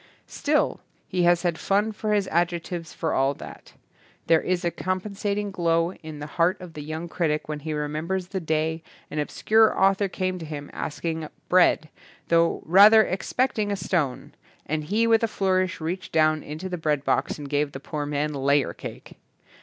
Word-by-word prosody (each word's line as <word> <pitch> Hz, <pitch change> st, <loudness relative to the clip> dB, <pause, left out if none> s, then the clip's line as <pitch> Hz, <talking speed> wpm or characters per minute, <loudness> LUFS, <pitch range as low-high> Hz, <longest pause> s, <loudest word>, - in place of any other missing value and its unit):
Still 300 Hz, +1 st, 0 dB, 0.3 s
he 180 Hz, -2 st, +1 dB
has 175 Hz, 0 st, +4 dB
had 170 Hz, -2 st, 0 dB
fun 205 Hz, +3 st, +1 dB
for 215 Hz, 0 st, -2 dB
his 200 Hz, -2 st, +1 dB
adjec 170 Hz, 0 st, +1 dB
tives 170 Hz, -3 st, -6 dB
for 160 Hz, -, -2 dB
all 135 Hz, +1 st, +2 dB
that. -, -, -11 dB, 0.5 s
There 165 Hz, -1 st, +4 dB
is 180 Hz, -1 st, -1 dB
a 170 Hz, -, +1 dB
compen 185 Hz, +3 st, -3 dB
sating 205 Hz, 0 st, -2 dB
glow 170 Hz, -1 st, +1 dB
in 155 Hz, -4 st, -10 dB
the 145 Hz, -, -6 dB, 0.2 s
heart 175 Hz, +3 st, +3 dB
of 180 Hz, -3 st, -10 dB
the 150 Hz, -, -7 dB
young 155 Hz, +3 st, -5 dB
critic 160 Hz, -3 st, -1 dB
when 150 Hz, -1 st, -4 dB
he 155 Hz, +2 st, -5 dB
remembers 155 Hz, +5 st, -3 dB
the 190 Hz, -, -2 dB
day 160 Hz, 0 st, -1 dB, 0.3 s
an 150 Hz, -, -2 dB
obscure 220 Hz, +8 st, +3 dB
author 195 Hz, +1 st, +3 dB
came 185 Hz, -1 st, -2 dB
to 165 Hz, -, -7 dB
him 145 Hz, -2 st, -7 dB
asking 160 Hz, 0 st, -4 dB, 0.2 s
bread, 180 Hz, -3 st, +4 dB, 0.4 s
though 170 Hz, 0 st, +3 dB
rather 205 Hz, +5 st, +8 dB
expecting 215 Hz, +2 st, -1 dB
a -, -, +1 dB
stone, 170 Hz, -8 st, -2 dB, 0.3 s
and 155 Hz, 0 st, -2 dB
he 215 Hz, +7 st, +1 dB
with 225 Hz, -1 st, +4 dB
a 230 Hz, -, +2 dB
flourish 185 Hz, -3 st, 0 dB
reached 175 Hz, +4 st, -4 dB
down 155 Hz, -1 st, +3 dB
into 155 Hz, +6 st, -6 dB
the 180 Hz, -2 st, -4 dB
breadbox 150 Hz, -3 st, 0 dB
and 145 Hz, -2 st, -7 dB
gave 145 Hz, 0 st, 0 dB
the 135 Hz, -, -7 dB
poor 145 Hz, +1 st, -4 dB
man 150 Hz, +1 st, -1 dB
layer 140 Hz, 0 st, +1 dB
cake. -, -, -10 dB
170 Hz, 185 wpm, -25 LUFS, 155-190 Hz, 0.5 s, rather